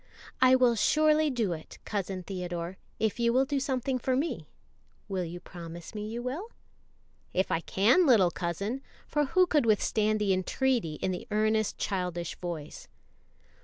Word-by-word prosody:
"I 255 0 +7
will 250 -2 +4
surely 305 +6 +3
do 230 -9 0
it, 160 -1 -9
Cousin 195 -3 -3
Theodore, 175 -1 -5 0.2
if 220 +1 -1
you 235 0 +3
will 260 +3 +3
do 280 0 -1
something 260 -1 -1
for 255 +1 0
me; 295 +6 -2 0.6
will 190 -3 -2
you 175 +1 -6
promise 170 0 -9
me 210 -1 -4
you 235 +2 -5
will?" 285 - -4 0.9
"If 185 - +1
I 165 - +2
can, 225 - +3
little 200 -9 +5
cousin;" 200 +11 -3 0.3
for 295 -1 +1
who 365 +7 +4
could 300 -8 +2
withstand 215 0 +2
the 200 -2 +2
entreaty 190 - 0
in 185 - -2
the 180 - -5
earnest 215 0 +1
childish 180 -3 -2
voice? 165 -4 -6
215 Hz, 160 wpm, -29 LUFS, 180-260 Hz, 0.9 s, I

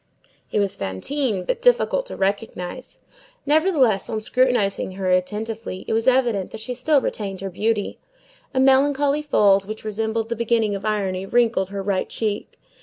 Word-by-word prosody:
It - - +1
was 200 -1 0
Fantine, 200 - -2
but - - -2
difficult - - +2
to - - -6
recognize. 195 +3 -3 0.5
Nevertheless, 290 - +2
on 220 - -2
scrutinizing 215 -5 +1
her 185 -1 -1
attentively, 210 +2 -2
it - - -1
was 225 +2 0
evident 240 -7 +2
that 220 - -8
she 225 +3 -4
still 275 +4 +2
retained 195 -6 -4
her 195 -1 -4
beauty. 210 +2 -1 0.5
A 260 - -1
melancholy 280 +2 +3
fold, 200 -9 +3
which 215 +1 -7
resembled 220 +1 -2
the 235 - -1
beginning 230 -2 +1
of 200 +1 -5
irony, 195 -3 -1
wrinkled 230 -5 +2
her 200 0 -4
right 195 -1 -1
cheek. 210 -2 -3
220 Hz, 160 wpm, -22 LUFS, 195-255 Hz, 0.5 s, melancholy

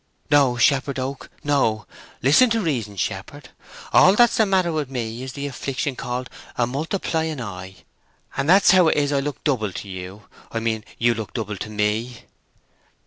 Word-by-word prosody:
"No, 140 -4 +4
Shepherd 135 +2 +2
Oak, 130 +1 -5
no! 135 -7 +1 0.4
Listen 150 - +6
to 225 0 +1
reason, 120 - -2
shepherd. 120 +9 -5 0.4
All 190 +2 +7
that's 240 +1 +4
the 220 - +4
matter 185 -3 +2
with 150 -4 -2
me 120 -2 -4
is 130 0 -6
the 140 0 -5
affliction 135 0 -3
called 125 +1 -4 0.3
a 120 - +2
multiplying 160 +3 -2
eye, 95 -4 -7 0.6
and 135 +3 -1
that's 195 +3 +7
how 185 -3 +6
it - - +2
is 145 -1 +1
I 140 - +2
look 145 +1 -5
double 115 -9 0
to 100 - -7
you—I 95 +4 -8
mean, 110 -1 -2
you 120 0 +3
look 110 -1 -6
double 105 -3 -3
to 105 - -6
me." 110 +3 -2
130 Hz, 170 wpm, -22 LUFS, 110-150 Hz, 0.6 s, All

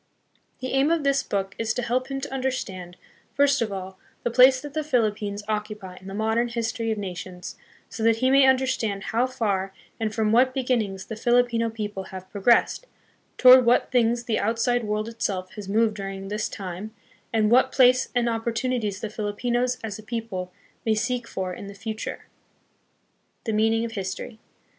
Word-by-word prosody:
The 255 - -3
aim 270 +2 +3
of 330 -2 +1
this 275 -1 +2
book 195 -1 -3
is 220 -1 -1
to 245 - -2
help 250 +2 0
him 275 0 -3
to 285 - -6
understand, 195 -10 -3 0.4
first 280 -2 +3
of 220 -3 -1
all, 190 -1 -6 0.2
the 240 - 0
place 255 +2 +7
that 290 +1 -9
the 310 0 -1
Philippines 210 -7 0
occupy 210 -3 -4
in 190 - -13
the 195 - -6
modern 220 +3 +1
history 230 -1 -2
of 220 - -1
nations, 185 -2 -6 0.3
so 225 - -8
that 225 0 +4
he 255 +3 +1
may 275 0 +6
understand 255 -6 +1
how 240 +3 +3
far 200 -7 -2 0.2
and 220 -1 -1
from 215 0 0
what 255 +3 +4
beginnings 230 -8 -1
the 220 - -6
Filipino 240 0 +2
people 210 -3 -5
have 185 0 -9
pro 200 - -6
gressed, 240 - +3 0.5
toward 255 0 +9
what 240 +1 +3
things 240 -1 +2
the 230 -2 0
outside 230 +2 +1
world 210 +1 -1
itself 190 -5 -3
has 205 -2 -8
moved 220 +1 +2
during 195 -1 -6
this 210 +1 -2
time, 195 +3 -7 0.4
and 220 -1 +2
what 260 +2 +5
place 255 -1 +4
and 240 -1 +2
opportunities 230 -2 -1
the 220 - -3
Filipinos, 240 +4 -1
as 215 -2 -5
a - - -8
people, 215 -5 -4 0.3
may 220 -1 +2
seek 240 +2 -1
for 185 -1 -4
in 200 - -8
the 200 - -9
future. 220 +2 -6 1.2
The 225 - -2
Meaning 225 +2 +2
of 230 - -5
History. 205 +2 -5
225 Hz, 180 wpm, -25 LUFS, 205-245 Hz, 1.2 s, toward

